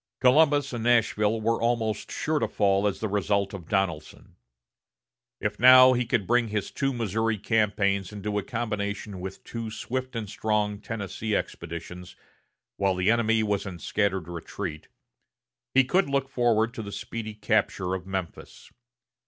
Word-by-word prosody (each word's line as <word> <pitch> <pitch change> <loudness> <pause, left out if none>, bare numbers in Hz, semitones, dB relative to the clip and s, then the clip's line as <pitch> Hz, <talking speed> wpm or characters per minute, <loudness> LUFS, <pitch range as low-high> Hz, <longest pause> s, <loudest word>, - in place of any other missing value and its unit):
Columbus 145 +1 +4
and 115 -2 -3
Nashville 115 -2 +2
were 115 +1 0
almost 115 -2 0
sure 155 -1 -1
to 115 - 0
fall 100 -1 +2
as 100 - -2
the 110 - 0
result 100 0 0
of 90 -5 -8
Donelson. 90 -6 -2 1.0
If 105 0 -3
now 130 +1 +9
he 125 -1 0
could 115 -4 +1
bring 120 +1 +2
his 105 -2 -3
two 135 0 -1
Missouri 110 -2 -1
campaigns 100 -3 +1
into 105 0 -3
a - - -2
combination 105 -3 -4
with 95 +1 -7
two 115 -1 -5
swift 130 +3 -4
and 110 -2 -3
strong 105 0 -1
Tennessee 110 0 -4
expeditions, 90 +2 -6 0.6
while 100 -1 +1
the 90 +4 +2
enemy 115 -1 +2
was 105 -2 -1
in 90 -3 -6
scattered 95 -2 -1
retreat, 85 -1 -6 0.9
he 135 - +7
could 180 +5 +1
look 135 -1 0
forward 115 -3 +1
to 115 - -5
the 100 -2 -7
speedy 110 0 -6
capture 95 -3 0
of 95 -1 -5
Memphis. 95 -3 -6
105 Hz, 155 wpm, -26 LUFS, 100-115 Hz, 1.0 s, now